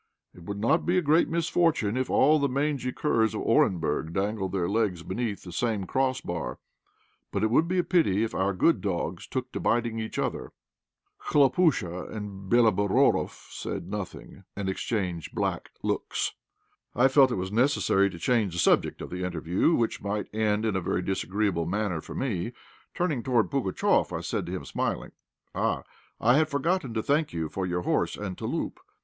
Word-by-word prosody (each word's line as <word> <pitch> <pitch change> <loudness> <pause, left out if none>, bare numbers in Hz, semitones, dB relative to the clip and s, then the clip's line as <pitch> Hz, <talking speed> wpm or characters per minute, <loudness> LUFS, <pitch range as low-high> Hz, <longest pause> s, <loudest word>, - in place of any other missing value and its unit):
It 85 - -14
would 100 +1 -4
not 115 +11 +2
be 180 +1 +1
a - - +4
great 155 +3 +4
misfortune 165 -8 +1
if 130 0 -1
all 150 +3 +5
the 140 -1 +1
mangy 140 -1 -1
curs 115 -6 +1
of - - -3
Orenburg 80 -2 +1
dangled 95 0 -1
their 90 -3 0
legs 100 -5 0
beneath 105 +2 -3
the 90 - -9
same 105 +1 -1
cross 130 +4 0
bar, 85 -2 -4 0.7
but - - -1
it 110 - +2
would 155 +7 +4
be 185 +2 0
a 180 - +3
pity 135 - +2
if 115 - -2
our 95 +1 +1
good 100 - +2
dogs 85 -3 -3
took 130 -1 -4
to - - -4
biting 115 -1 0
each 110 0 -5
other." - - -3 0.7
Khlopúsha 135 - +2
and 100 -2 -7
Béloborodoff 105 -5 +2
said - - -5
nothing, - - -7
and 100 -1 -3
exchanged 95 -5 -3
black - - -2
looks. - - -1 0.6
I 125 +2 +5
felt 135 0 +5
it - - 0
was 95 +1 -3
necessary 105 -5 +3
to 90 - -9
change 105 0 +1
the 85 - -3
subject - - +2
of - - -8
the 90 +1 -4
interview, 90 - +1
which 115 -1 0
might 105 +1 -3
end 110 0 +1
in 110 -3 0
a 95 - 0
very 90 +1 -1
disagreeable 95 -3 -1
manner 95 -3 -1
for - - -9
me. 115 -3 -2 0.4
Turning 160 -8 0
toward 115 -7 +1
Pugatchéf, 125 -9 +1
I - - -5
said - - -3
to - - -5
him, - - -4
smiling - - -2 0.4
"Ah! - - 0 0.4
I 120 +4 +4
had 155 0 +3
forgotten 145 -3 -1
to 110 - 0
thank 150 +2 +1
you 80 -2 -2
for 95 +2 -3
your 90 0 -1
horse - - 0
and 100 -3 -4
'touloup.' - - -3
110 Hz, 180 wpm, -27 LUFS, 95-130 Hz, 0.7 s, all